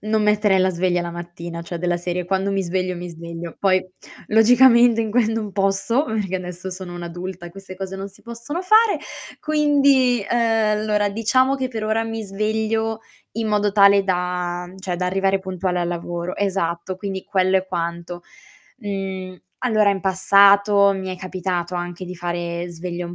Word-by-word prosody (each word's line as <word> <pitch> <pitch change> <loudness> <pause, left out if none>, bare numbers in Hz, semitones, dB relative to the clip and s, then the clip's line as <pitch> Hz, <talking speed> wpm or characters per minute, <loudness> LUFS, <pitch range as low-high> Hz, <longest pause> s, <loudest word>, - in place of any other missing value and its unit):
non 215 0 0
metterei 210 -2 +3
la 185 0 +3
sveglia 180 0 0
la 170 0 -4
mattina, 170 0 -7
cioè, 170 0 -6
della 175 0 0
serie 175 0 -3
quando 195 +1 0
mi 195 0 0
sveglio, 185 +1 -2
mi 175 0 -6
sveglio. 170 0 -8
Poi, 185 -2 +3 0.4
logicamente, 235 +1 +5
in 220 -1 -2
que 240 +2 +3
non 220 -2 -3
posso 195 +7 +1
perché 210 - -3
adesso 180 0 -7
sono 185 -1 -7
un'adulta 175 +1 -7
e - - -10
queste 190 0 -11
cose 195 0 -5
non 195 +1 -6
si 195 - -19
possono 235 +8 -6
fare. 430 +3 +4 0.4
Quindi, 280 -5 +3
ehm 225 -3 +2
allora, 210 -1 +1
diciamo 245 +6 +2
che 260 -1 -2
per 225 -3 -5
ora 220 +1 0
mi 225 0 -4
sveglio 220 +2 -1 0.3
in 225 0 -2
modo 210 -1 +1
tale 200 -1 +6
da 180 -1 -2
cioè, 185 -2 -4
da 180 +1 -1
arrivare 195 +1 +1
puntuale 185 -1 -2
al 175 - -1
lavoro. 175 +1 -4
Esatto, 185 -2 -2
quindi 190 -1 -5
quello 190 -1 +2
è 190 - -1
quanto. 170 -1 -4 0.6
Mhmm, 190 -3 -5 0.2
allora, 215 -4 +3
in 200 - -1
passato, 200 +1 +5
mi 190 -1 -5
è 185 - -8
capitato 180 -1 -3
anche 175 +1 -5
di 180 0 -7
fare 175 0 -4
sveglia 175 +1 -5
un 175 - -8
190 Hz, 175 wpm, -21 LUFS, 180-215 Hz, 0.6 s, tale